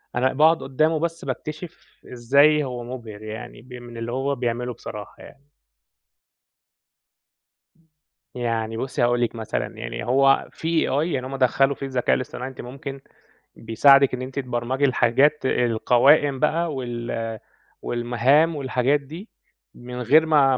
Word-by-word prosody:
أنا 130 +2 +1
باقعد 160 +4 +3
قُدّامه 155 +4 +1
بس 165 0 -3
باكتشف 155 +2 -8
إزاي 140 +5 +4
هو 125 -2 -5
مُبهر 115 -4 -9
يعني 110 0 -8
ب 125 +1 -15
من 120 -1 -10
اللي 115 +1 -5
هو 135 +2 -1
بيعمله 120 0 -3
بصراحة 105 -2 -9
يعني. 140 +1 -17 2.8
يعني 115 -2 -2
بُصّي 130 +1 -3
هاقول 120 0 +2
لِك 120 0 -1
مثلًا 110 -2 -4
يعني - - -5
هو 135 +2 +3
فيه 165 0 -1
AI 165 +2 -1
يعني 130 -1 -3
هم 135 +1 -5
دخّلوا 135 +2 +2
فيه 135 - -6
الذكاء 130 -2 +1
الاصطناعي 130 0 -5
أنتِ 130 - -11
ممكن 135 +2 -8 0.6
بيساعدِك 135 +4 +4
إن 125 - -3
أنتِ 130 +2 -5
تبرمجي 125 +2 -1
الحاجات 130 +3 +2
القوائم 130 +4 +3
بقى 160 +1 0
وال 120 -3 -4 0.4
والمهام 125 +7 +2
والحاجات 135 +1 0
دي 160 +10 -11 0.5
من 125 0 -8
غير 155 +7 +4
ما 140 -4 +4
130 Hz, 135 wpm, -23 LUFS, 120-140 Hz, 2.8 s, إزاي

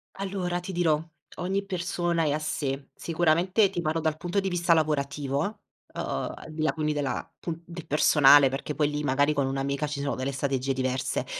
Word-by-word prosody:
Allora 190 -2 -2
ti 180 +2 -6
dirò 165 -4 +2 0.4
ogni 195 +3 -1
persona 175 -2 -1
è 150 - +1
a 150 - 0
sé. 140 -3 -3
Sicuramente 175 +5 +2
ti 180 -2 -3
parlo 160 0 -1
dal 155 -1 0
punto 175 +4 -1
di 195 - -1
vista 175 -1 +3
lavorativo, 140 -3 0 0.5
uhm, - - -3 0.3
al - - -11
di 155 0 -5
là 155 - +2
quindi 155 -1 -1
della 145 -3 -3
pun 165 -1 -5
del 170 -1 -9
personale, 145 -2 +6
perché 135 +2 -4
poi 150 -1 +2
lì 150 0 -3
magari 145 +2 +2
con 140 -2 +1
un'amica 135 +2 -1
ci 145 -1 -4
sono 140 0 -1
delle 130 +2 -2
strategie 135 -1 -1
diverse. 130 0 -1
155 Hz, 190 wpm, -27 LUFS, 140-175 Hz, 0.5 s, personale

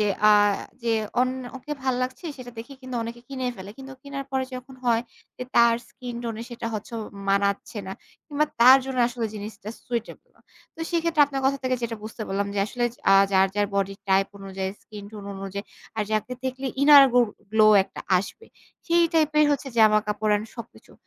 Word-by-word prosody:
যে, 210 - +3 0.2
আ - - +8 0.5
যে 235 - -2 0.3
অন্য 255 +1 0 0.2
ওকে 265 +4 -7
ভাল 260 -1 +1
লাগছে, 255 +7 -4
সেটা 250 -1 -9
দেখে 235 +5 -8
কিন্তু 255 -1 -5
অনেকে 235 +1 -7
কিনেই 260 -2 -3
ফেলে। 190 +1 -9
কিন্তু 270 0 -9
কিনার 275 -1 -6
পরে 265 -1 0
যখন 255 +1 -9
হয় 230 -1 +2 0.4
যে, - - -4
তার 235 0 +6
স্কিন 250 -2 -8
টোনে 230 0 -4
সেটা 235 -1 -5
হচ্ছে 215 +2 -6 0.4
মানাচ্ছে 200 +2 0
না, 190 - -5 0.3
কিংবা 300 -1 +1 0.2
তার 260 +3 +9
জন্য 265 -1 -4
আসলে 235 -2 -3
জিনিসটা 210 0 -8 0.2
সুইটেবল 235 -2 -5
না। - - -27 0.3
তো 325 - -12
সেক্ষেত্রে 335 -3 +3
আপনার 275 -1 -3
কথা 275 +1 +1
থেকে 255 0 0
যেটা 230 -1 -2
বুঝতে 220 +1 -7
পারলাম 200 +1 -1
যে, - - -1
আসলে 240 +1 -2 0.3
আ - - +8 0.2
যার, 190 0 +5
যার 205 0 +1
বডি 195 0 0
টাইপ 195 0 +4
অনুযায়ী, 190 -1 -4
স্কিন 210 -1 -10
টোন 210 -2 -9
অনুযায়ী, 195 +1 -6 0.3
আর 215 - +1
যাকে 215 +3 -1
দেখলে 260 +1 -3 0.2
ইনার 285 -1 +9
গো 245 - +6 0.3
গ্লো 215 -1 +5 0.2
একটা - - -10 0.2
আসবে, 430 - -7 0.4
সেই 340 0 +4
টাইপের 305 -1 +4
হচ্ছে 280 0 -3
জামা-কাপড় 215 -1 +3
অ্যান্ড 210 +1 0
সবকিছু 235 - -11
235 Hz, 190 wpm, -25 LUFS, 210-265 Hz, 0.5 s, তার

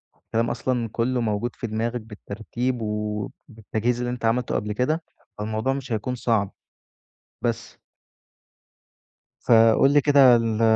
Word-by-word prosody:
الكلام 115 +1 -2
أصلًا 120 -1 -1
كلّه 120 +2 0
موجود 110 +2 -2
في 120 - -5
دماغك 115 +2 -2
بالترتيب، 115 +3 -4
وبالتجهيز 105 +2 -3
اللي 120 0 -2
أنت 125 -2 -4
عملته 120 +2 +1
قبل 105 +1 -2
كده، 155 +8 0 0.3
فالموضوع 110 +5 -1
مش 135 -2 -6
هيكون 115 +3 -2
صعب، 110 -5 0 0.9
بس. - - -3 1.7
فقُل 115 +3 +5
لي 145 - +5
كده 140 -4 +6
ال 115 -1 0
115 Hz, 125 wpm, -24 LUFS, 110-125 Hz, 1.7 s, كده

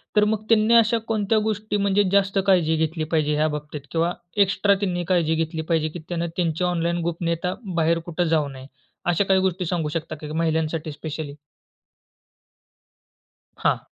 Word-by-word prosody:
तर 210 - +5
मग 215 -1 -2
त्यांनी 225 +1 +4
अशा 230 0 +5
कोणत्या 215 -1 +1
गोष्टी, 215 -1 -1
म्हणजे 200 0 +2
जास्त 200 0 +2
काळजी 170 -4 +4
घेतली 160 0 -1
पाहिजे 150 -2 +2
ह्या 155 +1 +2
बाबतीत? 150 -1 -5
किंवा 170 +1 +1 0.3
एक्स्ट्रा 200 +1 +2
त्यांनी 180 -3 -1
काळजी 160 -2 +2
घेतली 160 0 -2
पाहिजे, 160 -2 +1
की 170 +3 -8
त्यांना 170 -1 -1
त्यांची 170 -1 0
ऑनलाईन 170 -1 0
गोपनीयता 170 +1 -2 0.2
बाहेर 165 0 +2
कुठे 175 +1 -1
जाऊ 155 -3 +2
नये. 130 -1 -10 0.4
अशा 175 +3 +2
काही 190 -1 +3
गोष्टी 185 -1 0
सांगू 165 -2 -1
शकता 165 -1 -3
का 150 0 -8
महिलांसाठी 160 0 -1
स्पेशली? 150 0 -6 2.3
हां. - - +1
170 Hz, 160 wpm, -23 LUFS, 160-190 Hz, 2.3 s, तर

